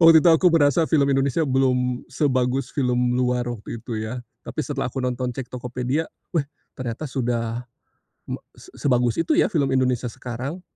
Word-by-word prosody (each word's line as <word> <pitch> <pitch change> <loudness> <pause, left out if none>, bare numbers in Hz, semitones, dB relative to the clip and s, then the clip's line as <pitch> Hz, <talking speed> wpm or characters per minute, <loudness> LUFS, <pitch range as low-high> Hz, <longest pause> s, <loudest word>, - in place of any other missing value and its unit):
waktu 165 -1 +9
itu 175 - +8
aku 175 +2 +5
berasa 160 0 +4
film 145 -4 +4
Indonesia 140 +3 +2
belum 125 -2 +1
sebagus 130 -2 0
film 125 -2 +1
luar 125 -1 +1
waktu 120 -1 -5
itu 115 -1 -5
ya 110 +4 -4 0.2
tapi 155 - -4
setelah 140 -4 -2
aku 130 +1 -3
nonton 125 0 -1
cek 130 -2 -6
Tokopedia 125 +5 -2 0.2
weh, 165 -5 +2 0.3
ternyata 125 +3 -5
sudah 120 -4 -1 0.9
se - - -15
sebagus 125 -4 +2
itu 165 - +2
ya 355 - +4
film 155 -9 +2
Indonesia 130 -2 +1
sekarang.. 130 +10 -5
130 Hz, 160 wpm, -23 LUFS, 125-145 Hz, 0.9 s, waktu